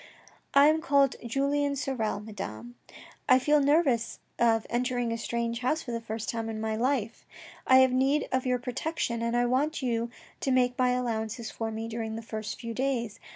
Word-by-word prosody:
I 280 +1 +8
am 310 +1 +4
called 280 -4 +3
Julien 280 +4 0
Sorel, 245 -7 -2
Madame. 120 - -7 0.6
I 255 - +8
feel 295 +3 +3
nervous 280 -5 +2 0.2
of 225 -2 +3
entering 245 -1 -1
a - - 0
strange 235 0 -2
house 305 +6 0
for 245 - -6
the 230 0 -3
first 220 -1 -5
time 225 -1 -2
in 220 -1 -4
my 220 0 -1
life. 240 -1 -1 0.4
I 260 0 +7
have 260 -1 +4
need 270 +3 +2
of 260 -1 +1
your 250 0 +2
protection 245 -1 -3
and 235 +1 0
I 245 - +3
want 270 +5 0
you 235 -1 0 0.3
to - - -2
make 250 -1 +2
many 250 -1 +3
allow 235 -3 -1
ances 220 +1 -6
for 225 -1 -3
me 220 +1 -4
during 225 -1 -4
the 225 - -6
first 215 -1 -5
few 230 -1 -5
days. 235 -4 -2
240 Hz, 195 wpm, -28 LUFS, 225-265 Hz, 0.6 s, I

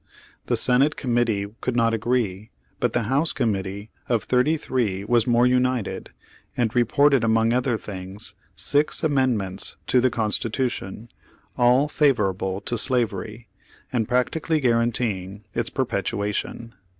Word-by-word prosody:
The - - +1
Senate 135 +4 +2
Committee 120 -5 0 0.2
could 125 - -2
not 115 -1 +3
agree, 115 -3 -1 0.3
but - - 0
the 120 - +1
House 135 +8 +1
Committee 100 -3 -2 0.2
of 115 -4 +1
thirty 130 +6 +2
three 110 -10 -1
was 120 +2 +2
more 120 0 +4
united, 125 -3 0 0.5
and 115 -2 +1
reported 135 +2 +3
among 115 0 +3
other 125 -1 +1
things, 95 -1 -6 0.2
six 145 +3 +1
amendments 125 - 0
to 125 - +3
the 130 - +3
Constitution, 115 -1 -2 0.5
all 125 +4 +4
favorable 95 -10 +1
to 120 +3 -2
slavery, 115 -2 -2 0.5
and 115 -4 0
practically 155 +6 0
guaranteeing 115 -6 0
its 115 0 -1
perpetuation. 115 -1 -2
120 Hz, 125 wpm, -24 LUFS, 105-125 Hz, 0.5 s, more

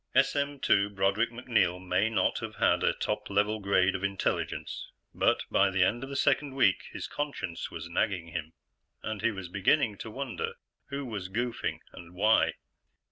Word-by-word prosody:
SM/2 135 -8 +2
Broderick 100 +4 +2
MacNeil 115 -7 +1
may 95 +3 +1
not 115 - +1
have - - -6
had - - +3
a - - +4
top - - -3
level 105 +2 +1
grade 95 -2 +3
of 95 - -4
intelligence, 100 -1 -2 0.3
but - - +2
by - - +4
the 95 -1 +3
end 120 +7 +1
of 135 - -6
the 140 - -5
second 140 0 +2
week, 120 -8 +3
his - - -5
conscience 140 - -4
was 85 0 -7
nagging 85 -1 -1
him, 80 -1 -5 0.5
and 110 -2 -4
he 115 - +3
was 95 -5 -6
beginning 100 - +2
to 110 - -6
wonder 300 - -4 0.3
who 140 0 -4
was 100 -6 -5
goofing 120 +3 -2
and 85 +1 -12
why. 105 +4 +4
105 Hz, 170 wpm, -29 LUFS, 95-125 Hz, 0.5 s, a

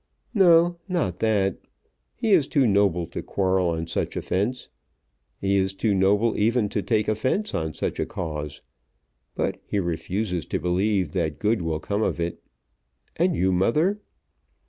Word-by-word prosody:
"No, 175 -4 +5
not 165 - -1
that. 100 -4 +1 0.6
He 225 -2 -1
is 165 -8 +5
too 140 -4 +2
noble 100 -5 +2
to - - -6
quarrel 95 -2 +1
on 80 0 -2
such 80 - -3
offence. 105 +8 -2 0.7
He 100 0 +1
is 95 0 0
too 105 +1 +1
noble 100 +4 +2
even 110 0 +2
to 105 - -1
take 105 +2 0
offence 130 - 0
on 80 -1 -2
such - - -3
a - - -1
cause. 75 -4 -5 0.7
But - - -2
he - - -3
refuses 90 +1 -2
to - - -1
believe 95 +3 0
that 80 -6 -1
good 105 -1 +1
will 80 -2 -2
come 100 +5 -2
of 110 - 0
it. 85 0 -3 0.8
And 175 0 +2
you, 95 +1 +2
mother?" 155 - +2
100 Hz, 155 wpm, -24 LUFS, 90-115 Hz, 0.8 s, No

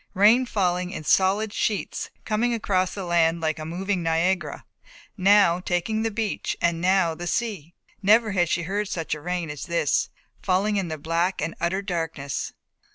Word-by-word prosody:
Rain 225 +6 +5
falling 180 -4 0
in 155 - -6
solid 200 +6 +2
sheets, 210 -3 -2 0.2
coming 235 +3 +1
across 185 -4 0
the 195 -2 -5
land 170 -1 +2
like 160 -1 -1
a 155 - -5
moving 185 +3 -2
Niagara, 165 -1 0 0.5
now 195 -2 +5
taking 185 +5 -1
the 225 - 0
beach 220 -1 -2
and 170 -1 +1
now 185 -2 +3
the 175 +2 -6
sea. 185 -8 -3 0.3
Never 215 +2 +4
had 175 -4 +1
she 175 - 0
heard 200 +4 -2
such 165 -6 -3
rain 170 +1 -3
as 150 - -6
this, 170 -4 +1 0.3
falling 200 +3 +1
in 190 -3 -1
the 155 -1 -4
black 165 +5 -1
and 165 +2 -2
utter 185 +4 0
darkness. 165 -7 -3
180 Hz, 165 wpm, -25 LUFS, 165-205 Hz, 0.5 s, Rain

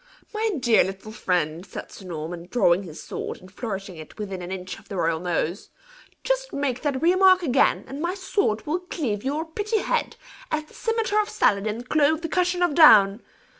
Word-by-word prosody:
"My 440 +1 0
dear 235 -5 +4
little 195 +3 -6
friend," 175 -6 -1
said - - -9
Sir 195 - -12
Norman, 170 +1 -6
drawing 185 -6 +3
his 165 -5 -9
sword, - - -5
and 185 +1 -15
flourishing 195 -4 -6
it 155 -1 -11
within 195 -3 -5
an 175 +1 -7
inch 185 -1 -6
of 205 - -22
the 195 - -5
royal 165 -1 +1
nose, 175 +1 -2 0.5
"just - - -1
make 280 -3 -2
that 280 -2 -1
remark 370 +1 +5
again, 270 -4 +2
and 275 +2 -6
my 350 +3 -1
sword 380 - -1
will 315 +4 -1
cleave 275 - -3
your 295 +4 -2
pretty 415 +7 -2
head, - - -1 0.3
as 310 0 -1
the 305 - -21
cimetar 450 -2 0
of 420 - -5
Saladin 210 +3 +1
clove 310 +4 +2
the 330 - -4
cushion 360 0 +1
of 350 -4 +2
down! 210 -10 +7
245 Hz, 190 wpm, -24 LUFS, -, 0.5 s, down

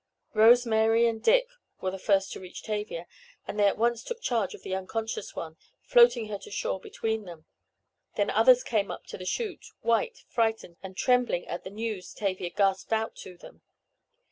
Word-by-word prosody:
Rose 235 +3 +6
Mary 225 +1 +3
and 225 -1 0
Dick - - +4 0.3
were 185 - -2
the 190 - -6
first 195 -1 +2
to - - -6
reach 185 -1 -10
Tavia, 210 -5 -4 0.4
and 210 - -4
they 205 - +6
at 200 - +1
once 235 +1 +1
took 480 -1 -5
charge 225 - -1
of - - -16
the 190 - -4
unconscious 215 +3 -4
one, 160 -1 -6 0.3
floating 240 -2 +5
her 205 -1 -5
to - - -12
shore 190 -1 -2
between 220 +2 -3
them. 165 -3 -11 0.7
Then - - +1
others - - +6
came 210 - 0
up - - -7
to - - -6
the 185 - -7
chute, 440 - -3
white, 455 - 0
frightened 225 -7 -1
and 190 -1 -9
trembling 250 -8 +2
at 175 - -5
the - - -7
news 210 -2 -5
Tavia 185 -3 -2
gasped 195 +2 0
out 220 0 0
to 180 -1 -10
them. - - -15
215 Hz, 190 wpm, -28 LUFS, 190-235 Hz, 0.7 s, Rose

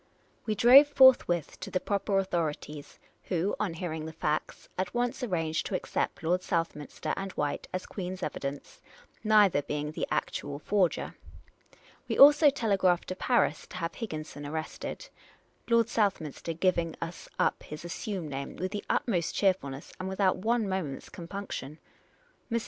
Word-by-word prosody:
We 215 - +1
drove 255 +7 +8
forthwith 260 - +4
to - - -6
the 185 - 0
proper 200 0 0
authorities, 160 -5 -3 0.3
who, 180 +2 0
on 190 -6 -1
hearing 160 -2 -4
the - - -6
facts, 155 -1 -2
at 185 +4 -3
once 245 +2 -1
arranged 165 -9 -1
to 195 - -2
accept 180 - -2
Lord 180 +3 +1
South 165 -2 -1
minster 150 -1 -5
and 195 0 -4
White 145 -1 -2
as 185 - -3
Queen's 185 -1 -5
evidence, 140 +1 -5 0.4
neither 210 -8 +5
being 150 +1 -3
the - - -3
ac - - -1
tual 145 0 -6
forger. 190 +1 0 0.9
We - - -2
also 295 +2 +9
telegraphed 195 -8 +1
to 185 - -3
Paris 240 +5 +1
to - - -9
have 165 -1 -3
Higginson 155 -9 -6
arrested, 155 - -5 0.6
Lord 230 -1 +5
vSouthminster 170 - -1
giving 170 -3 +1
us 165 +1 -7
up - - +1
his 150 +3 -9
assumed 175 -2 -4
name 140 0 -5
with 185 +2 -3
the 205 - -4
utmost 175 -8 0
cheerfulness, 155 -9 0
and 185 +1 -3
without 190 -1 +2
one 225 +3 +1
moment's 185 -8 -3
compunction. 170 -5 -6 0.7
Mr. 230 - +2
185 Hz, 155 wpm, -29 LUFS, 160-205 Hz, 0.9 s, also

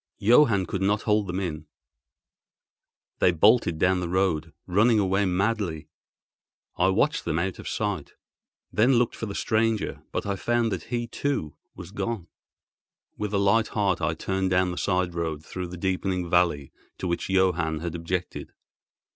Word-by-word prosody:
Johann 115 -3 +4
could 95 +2 -4
not 105 +2 +1
hold 105 -2 +1
them 90 +1 -2
in; 80 -5 -4 1.5
they 90 - +5
bolted 95 0 +4
down 90 +3 +2
the 90 -1 -3
road, 85 -4 0
running 105 +5 +3
away 95 0 +2
madly. 95 -3 -1 0.9
I 90 - +2
watched 110 +11 +1
them 80 -2 -1
out 90 +2 -2
of - - -8
sight, - - -3 0.6
then 120 +5 +4
looked 120 0 +2
for 115 - -5
the 100 - -6
stranger, 110 -1 0
but - - -3
I 100 -1 -2
found 120 +2 0
that 95 -5 -4
he, 120 0 -2
too, 115 - -3 0.2
was - - -10
gone. 115 -7 -3 0.9
With 105 -1 -2
a 100 - +1
light 100 +3 +3
heart 100 -4 0
I 80 - 0
turned 95 +3 -1
down 90 0 +2
the - - -5
side 90 -3 0
road 80 -2 -3
through 90 -1 -5
the 90 +1 -8
deepening 95 0 -1
valley 85 -5 +1 0.3
to 95 - -4
which 85 +2 -2
Johann 85 -5 +1
had 85 -1 -4
objected. 85 +1 -4
95 Hz, 165 wpm, -26 LUFS, 85-105 Hz, 1.5 s, they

